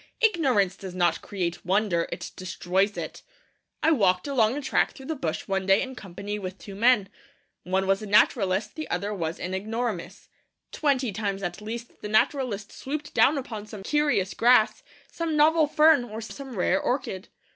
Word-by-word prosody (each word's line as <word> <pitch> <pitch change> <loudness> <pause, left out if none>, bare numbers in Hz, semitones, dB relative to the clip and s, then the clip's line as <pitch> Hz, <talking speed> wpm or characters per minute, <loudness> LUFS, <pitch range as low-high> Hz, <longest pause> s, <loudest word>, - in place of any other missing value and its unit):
Ignorance 270 - +2
does 185 -2 -8
not 175 -2 +1
create 175 -4 -3
wonder; 185 -2 +1
it - - -6
destroys 185 +2 -1
it. - - -6 0.6
I 320 - +5
walked 190 - +3
along 250 -2 +2
a - - -3
track - - +1
through 265 - -12
the 320 - -3
bush 160 - -3
one 195 -1 -1
day 195 +1 +5
in 260 -1 -6
company 205 -1 -6
with 185 -1 -6
two 200 - -10
men. 225 0 +3 0.6
One 190 +2 0
was 195 +1 +1
a 215 - -6
naturalist; 200 -1 +3
the 310 - -6
other 200 +4 -2
was 165 -4 -3
an 180 +1 -4
ignoramus. 205 -2 -4 0.4
Twenty 270 -6 +1
times 200 -1 -3
at 175 +2 -4
least 235 +3 -7
the 210 - -5
naturalist 215 -2 +1
swooped 295 +2 -6
down 290 +2 +4
upon 220 -6 -6
some 210 -2 -9
curious 290 -8 +1
grass, 245 - +4 0.3
some 330 -2 -2
novel 310 +1 +5
fern, 300 -2 +5
or 220 -1 -7
some 260 +3 -8
rare 185 0 +1
orchid. 245 -8 -2
210 Hz, 175 wpm, -26 LUFS, 190-265 Hz, 0.6 s, I